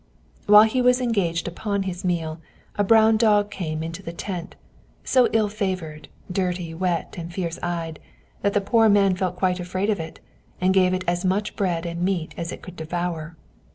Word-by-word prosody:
While 210 +1 +9
he 220 +4 +1
was 250 0 +4
engaged 195 -10 0
upon 200 +3 -2
his 185 -1 -5
meal, 165 -3 -2 0.3
a 205 - +2
brown 220 +1 +5
dog 210 -2 +3
came 160 -5 -3
into 165 +1 -6
the 170 - -6
tent, 175 0 -6 0.5
so 255 -2 +4
ill 220 -2 +2
favored, 185 -7 -4 0.2
dirty, 180 -3 -2
wet, 175 0 -1
and 170 0 -6
fierce 170 -2 -4
eyed, 165 -2 -3 0.4
that 200 - +1
the 205 - +3
poor 225 +2 +4
man 200 -2 +4
felt 180 -1 -2
quite 180 0 0
afraid 185 +4 -1
of 205 - -1
it, 160 0 -7 0.4
and 185 +1 +3
gave 185 -1 +4
it 185 - -3
as 175 +1 0
much 195 +3 0
bread 175 -4 -1
and 170 0 -4
meat 180 -3 -1
as 170 0 -4
it - - -9
could 180 -1 -10
devour. 165 0 -4
185 Hz, 190 wpm, -24 LUFS, 170-205 Hz, 0.5 s, While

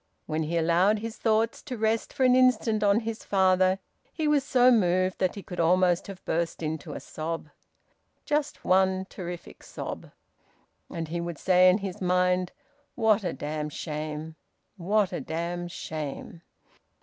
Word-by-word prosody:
When 155 +1 -2
he 160 +2 -1
allowed 170 +6 +3
his 225 +2 -6
thoughts 225 0 +1
to 255 -4 -6
rest 220 +1 0
for 265 - -1
an 255 -1 +5
instant 240 -4 +3
on 205 +2 +4
his 225 0 -5
father 185 -1 +3 0.3
he 315 -2 -2
was 295 -2 +3
so 255 -2 +4
moved 185 -4 +2
that 185 -1 0
he 200 - -7
could 180 - -8
almost 175 +1 +3
have 195 -2 -10
burst 165 0 -2
into 155 -1 -4
a - - -5
sob 160 0 -5 0.8
just 295 0 -1
one 190 0 +3
terrific 175 -2 -8
sob. - - -7 0.8
And 165 -2 -5
he 170 +1 -2
would 170 -2 -5
say 185 +1 +5
in 180 - +4
his 195 -3 -6
mind, 180 0 +2 0.4
"What 220 -3 +3
a 175 - -1
damned 150 0 -4
shame! 155 0 -5 0.4
What 200 +1 +1
a - - -3
damned 175 +2 -4
shame!" 155 +1 -6
185 Hz, 160 wpm, -27 LUFS, 170-215 Hz, 0.8 s, an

